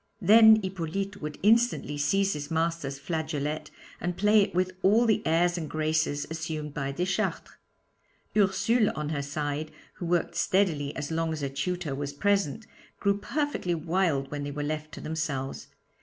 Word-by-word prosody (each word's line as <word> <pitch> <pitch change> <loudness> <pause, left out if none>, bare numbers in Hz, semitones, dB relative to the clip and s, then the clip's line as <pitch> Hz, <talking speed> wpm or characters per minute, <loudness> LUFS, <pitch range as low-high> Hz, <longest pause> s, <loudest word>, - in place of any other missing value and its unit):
Then 220 0 +7
Hippolyte 190 +2 -4
would 150 -1 -5
instantly 225 -8 +3
seize 195 +7 +1
his 145 -1 -5
master's 165 -4 -1
flageolet 155 0 -3 0.3
and 175 0 -3
play 210 +1 +5
it 195 - -1
with 185 +1 +1
all 215 +5 +4
the 220 -2 +2
airs 175 +2 +2
and 155 -3 -5
graces 155 -2 0
assumed 160 -2 -4
by 140 -2 -2
Deschartres. 180 +7 -2 0.8
Ursule 215 +3 +3
on 150 -1 -3
her 145 -2 -1
side, 145 +1 -3 0.3
who 175 - -4
worked 175 -1 0
steadily 160 -7 +1
as 145 - -4
long 165 0 0
as 155 - -5
her 140 - -1
tutor 165 +2 -3
was 140 +1 -4
present, 200 +3 0 0.3
grew 200 0 +1
perfectly 290 - -1
wild 160 -4 0
when 145 -1 -3
they 145 - -4
were 145 +1 -4
left 155 +1 -3
to - - -8
themselves. 145 -4 -3
160 Hz, 160 wpm, -28 LUFS, 145-195 Hz, 0.8 s, Then